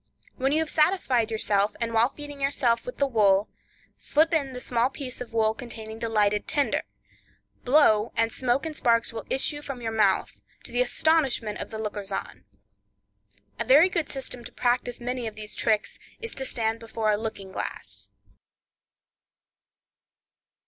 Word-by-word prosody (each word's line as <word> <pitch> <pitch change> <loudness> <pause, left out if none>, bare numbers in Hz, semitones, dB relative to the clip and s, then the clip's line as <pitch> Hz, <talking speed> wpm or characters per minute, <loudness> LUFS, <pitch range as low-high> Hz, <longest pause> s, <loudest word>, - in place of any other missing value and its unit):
When 265 +1 0
you 300 - +2
have 320 - -2
satisfied 300 - +2
yourself, 210 -2 +1
and 230 -1 -2
while 230 +2 +4
feeding 290 -1 -9
yourself 275 - +1
with - - -6
the 280 - +3
wool, 210 -5 +3 0.5
slip 315 +3 +2
in 280 -5 +1
the 250 - -5
small 245 0 +1
piece 260 -3 -6
of 245 - -6
wool 220 -1 +2
containing 225 -2 -8
the 230 - -2
lighted 210 -1 +2
tinder; 285 -2 +1 0.8
blow, 240 -5 +4
and 230 0 +1
smoke 255 +3 0
and 315 -1 -4
sparks 230 -4 +2
will 225 - -6
issue 290 +2 +1
from 275 -3 -6
your 230 -2 -3
mouth, 220 -1 +1 0.2
to - - -11
the 245 +1 +1
astonishment 255 -5 +1
of - - -5
the 220 - -6
lookers 205 -2 -5
on. 195 - -5 1.1
A - - +1
very 300 +8 +6
good 335 -4 -1
system 255 -3 -5
to - - -9
practice 245 0 0
many 245 0 -3
of 215 - -7
these 215 -1 -8
tricks, 215 -2 0 0.2
is 460 0 -6
to 265 - -3
stand 225 -2 -1
before 225 -1 -1
a - - +3
looking 205 -3 -5
glass. - - -5
240 Hz, 165 wpm, -26 LUFS, 220-275 Hz, 1.1 s, very